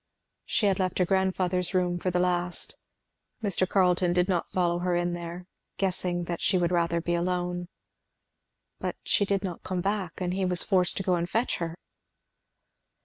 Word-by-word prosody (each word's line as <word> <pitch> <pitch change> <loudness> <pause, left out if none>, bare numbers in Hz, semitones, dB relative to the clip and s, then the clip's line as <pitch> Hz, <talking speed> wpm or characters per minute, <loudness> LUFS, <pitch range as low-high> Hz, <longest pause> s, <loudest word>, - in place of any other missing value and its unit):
She 215 - +1
had 195 -1 +2
left 185 -1 0
her 180 - +3
grandfather's 185 -1 0
room 175 -1 +1
for 185 - -1
the 180 - 0
last. 180 0 -1 0.6
Mr. 185 -2 +1
Carleton 180 -2 +3
did 180 0 +2
not 180 -3 0
follow 175 -1 +1
her 180 0 0
in 175 0 0
there, 175 +1 -6 0.3
guessing 180 -2 0
that 170 0 -4
she 190 - +3
would 175 -1 +1
rather 170 -1 +2
be 175 +1 -1
alone. 175 0 -1 1.1
But - - -3
she 205 - +2
did 195 0 0
not 180 -3 -4
come 185 -1 -2
back, 195 -3 -1
and 180 -1 -2
he 190 +1 -1
was 180 -1 +3
forced 185 -3 +3
to 195 - -1
go 180 -2 +2
to 170 - -1
fetch 230 +7 0
her. 165 -1 -4
180 Hz, 180 wpm, -28 LUFS, 175-185 Hz, 1.1 s, her